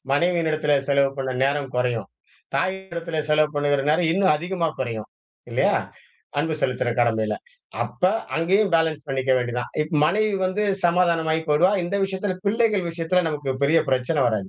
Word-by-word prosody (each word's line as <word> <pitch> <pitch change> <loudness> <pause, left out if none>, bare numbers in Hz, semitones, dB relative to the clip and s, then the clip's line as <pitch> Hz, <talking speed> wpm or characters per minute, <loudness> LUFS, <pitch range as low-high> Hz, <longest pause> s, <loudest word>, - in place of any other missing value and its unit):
மனைவியின் 170 +2 +2
இடத்திலே 150 -1 +2
செலவு 140 -1 +3
பண்ண 130 -1 -2
நேரம் 140 -1 -1
கொறையும். 120 -5 -1 0.5
தாயினிடத்திலே 170 -4 -2
செலவு 150 0 +4
பண்ணுகிற 145 -1 +1
நேரம் 160 +1 +2
இன்னும் 190 -4 +3
அதிகமா 170 0 -2
கொறையும். 115 -4 -4 0.4
இல்லையா? - - +2 0.6
அன்பு 155 +1 0
செலுத்துற 125 -1 0
கடமையில. 110 -2 +1 0.5
அப்ப - - -9 0.3
அங்கேயும் 190 +5 +2
பேலன்ஸ் 160 -2 +1
பண்ணிக்க 135 -1 -1
வேண்டியது 120 -1 -1
தான். 120 - -5
இப்ப 155 +1 -5
மனைவி 205 +6 +2
வந்து 185 +3 0 0.2
சமாதானமாயி 170 -2 +2
போயிடுவா. 160 +6 +4
இந்த 185 +4 -2
விஷயத்தில 190 0 -2
பிள்ளைகள் 210 -2 +2
விஷயத்தில 170 +2 0
நமக்கு 145 -3 -3
பெரிய 155 +4 +4
பிரச்சனை 130 +4 +1
வராது. 110 -5 -1
160 Hz, 150 wpm, -23 LUFS, 135-180 Hz, 0.6 s, செலவு